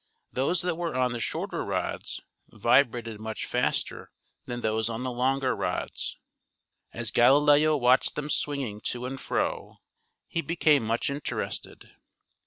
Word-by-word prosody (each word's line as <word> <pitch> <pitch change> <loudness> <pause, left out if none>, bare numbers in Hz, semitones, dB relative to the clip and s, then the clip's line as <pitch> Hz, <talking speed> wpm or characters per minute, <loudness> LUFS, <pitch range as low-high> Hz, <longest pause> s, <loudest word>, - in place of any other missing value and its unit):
Those 140 +8 +1
that 180 -2 -1
were 170 -5 -2
on 130 -1 +2
the 120 - -3
shorter - - -3
rods - - -3 0.3
vibrated 115 -1 +2
much 110 0 -4
faster - - -1 0.4
than 120 0 -4
those 110 +1 0
on 115 +2 -4
the 130 - -2
longer 130 +1 +1
rods. - - -3 0.7
As - - -4
Galileo 145 +4 +5
watched 125 0 +4
them 150 0 -3
swinging 135 -8 -2
to 125 0 -2
and 130 +1 -5
fro - - -2 0.5
he 165 - -1
became 155 -4 +3
much 115 +5 0
interested. 145 +1 -5
130 Hz, 135 wpm, -28 LUFS, 120-145 Hz, 0.7 s, Galileo